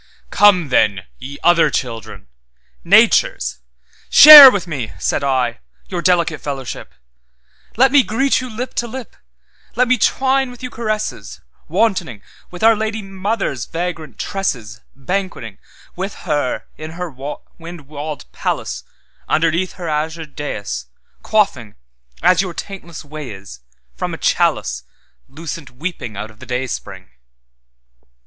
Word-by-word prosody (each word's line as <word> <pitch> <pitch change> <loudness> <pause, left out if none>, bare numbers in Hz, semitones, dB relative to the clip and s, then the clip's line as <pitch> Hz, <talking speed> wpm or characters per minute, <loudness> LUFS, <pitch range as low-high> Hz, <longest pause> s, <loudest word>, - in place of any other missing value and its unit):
'Come 185 -7 +4
then, 100 -6 +2 0.2
ye 140 +2 -8
other 175 -1 +4
children, 115 - -5 0.6
Nature's—shareWith 70 - +7
me' 135 - -5
(said - - -1
I) 130 -4 0 0.3
'your 180 -2 -3
delicate 170 -4 +1
fellowship; 135 -3 -6 0.8
Let 260 +2 +5
me 285 0 +6
greet 260 +4 0
you 255 - -7
lip 245 +3 -6
to 240 - -7
lip, 250 +1 -9 0.6
Let 250 +2 +2
me 255 0 +2
twine 265 0 +1
with 245 +1 -13
you 250 - -5
caresses, 215 -2 -4 0.3
WantoningWith 180 - -3
our 225 0 +6
Lady 220 0 -3
Mother's 195 - -3
vagrant 165 -5 -5
tresses, 115 - -4 0.2
BanquetingWith 185 - -6
her 145 -6 -1
in 155 +1 -8
her 180 -2 -5 0.5
wind 170 0 -9
walled 145 +1 -7
palace, - - -3 0.5
Underneath 165 +3 +1
her 175 -2 -7
azured 155 0 -4
daïs, 100 - -5 0.4
Quaffing, 140 - 0 0.5
as 185 0 +4
your 180 -3 -5
taintless 170 -6 -8
way 150 -1 -8
is, 95 -6 -11 0.3
From - - -4
a - - -10
chaliceLucent 140 - -3
weeping 140 - -5
out 110 +2 -6
of 110 - -22
the - - -12
dayspring. 125 - -5
165 Hz, 120 wpm, -18 LUFS, 130-205 Hz, 0.8 s, Nature's—shareWith